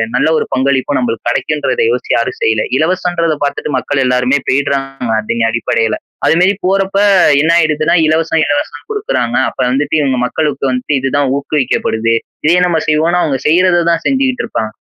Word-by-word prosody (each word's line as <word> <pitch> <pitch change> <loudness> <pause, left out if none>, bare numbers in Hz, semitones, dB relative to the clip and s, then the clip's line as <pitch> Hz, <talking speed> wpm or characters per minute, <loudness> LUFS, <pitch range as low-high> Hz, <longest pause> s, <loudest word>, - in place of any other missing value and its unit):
நல்ல 135 +5 +2
ஒரு - - -1
பங்களிப்பும் 135 +1 0
நம்பளுக்கு 115 -2 -3
கெடைக்கும்ன்றத 150 - -1
யோசிச்சு - - -3
யாரும் - - -1
செய்யல. 450 +1 +1
இலவசம்ன்றத 170 -1 0
பாத்துட்டு 145 +1 -3
மக்கள் 135 +2 -1
எல்லாருமே 125 +2 +1
போயிட்றாங்க 135 -2 -1
அதன் 115 +1 -1
அடிப்படையில. 115 -1 0 0.3
அதுமாரி 180 +4 +3
போறப்ப 195 +1 0 0.4
என்ன 160 +2 +2
ஆயிடுதுனா 155 0 +1
இலவசம், 160 +1 +1
இலவசம் 145 0 -3
குடுக்குறாங்க 255 - -2
அப்ப - - -19
வந்துட்டு 145 +4 0
இவுங்க 135 -3 0
மக்களுக்கு 140 0 -1
வந்துட்டு 125 +3 -1
இதுதான் 135 +1 0
ஊக்குவிக்கப்படுது. 120 -5 -1 0.3
இதே 170 +3 +4
நம்ம 165 -2 +1
செய்வோன்னு 165 +3 +2
அவுங்க 135 -5 -1
செய்றத 175 +2 +3
தான் 165 0 -1
செஞ்சுகிட்டு 265 -1 0
இருப்பாங்க. 110 -1 -3
145 Hz, 150 wpm, -14 LUFS, 130-165 Hz, 0.4 s, இதே